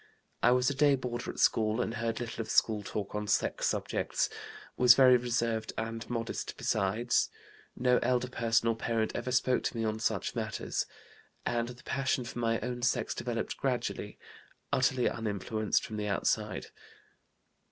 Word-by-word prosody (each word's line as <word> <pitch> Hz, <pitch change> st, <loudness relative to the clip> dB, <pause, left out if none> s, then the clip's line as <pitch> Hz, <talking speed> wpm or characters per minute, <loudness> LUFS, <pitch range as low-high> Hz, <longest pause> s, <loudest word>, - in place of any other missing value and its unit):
I -, -, +5 dB
was 125 Hz, 0 st, +3 dB
a 140 Hz, -, +2 dB
day 145 Hz, 0 st, +4 dB
boarder 125 Hz, -2 st, -4 dB
at -, -, -6 dB
school 110 Hz, +1 st, +3 dB
and 115 Hz, -, -1 dB
heard 115 Hz, -1 st, -2 dB
little 120 Hz, -1 st, -4 dB
of 110 Hz, -, -7 dB
school 110 Hz, -2 st, +3 dB
talk 100 Hz, 0 st, -5 dB
on 105 Hz, 0 st, -3 dB
sex -, -, +1 dB
subjects, -, -, -1 dB, 0.5 s
was 125 Hz, -1 st, +7 dB
very 130 Hz, -2 st, +7 dB
reserved 115 Hz, -2 st, 0 dB
and 115 Hz, 0 st, -4 dB
modest 115 Hz, -1 st, -3 dB
besides; 110 Hz, +6 st, +1 dB, 0.5 s
no 125 Hz, 0 st, +3 dB
elder 125 Hz, 0 st, +1 dB
person 115 Hz, -2 st, +1 dB
or 115 Hz, -, +2 dB
parent 115 Hz, -1 st, -1 dB
ever 120 Hz, +1 st, -2 dB
spoke 125 Hz, 0 st, +2 dB
to -, -, -2 dB
me 115 Hz, -, -1 dB
on 110 Hz, 0 st, -1 dB
such -, -, -1 dB
matters; -, -, -2 dB, 0.6 s
and 120 Hz, -1 st, 0 dB
the 125 Hz, +1 st, -10 dB
passion 130 Hz, -1 st, 0 dB
for 120 Hz, -, -6 dB
my 115 Hz, -1 st, +1 dB
own 125 Hz, -1 st, -4 dB
sex 120 Hz, -, +1 dB
developed -, -, -3 dB
gradually, -, -, -2 dB, 0.6 s
utterly 130 Hz, -2 st, +2 dB
uninfluenced 110 Hz, 0 st, -1 dB
from 110 Hz, -, -6 dB
the 105 Hz, 0 st, -2 dB
outside. 105 Hz, 0 st, -1 dB
115 Hz, 165 wpm, -31 LUFS, 110-125 Hz, 0.6 s, was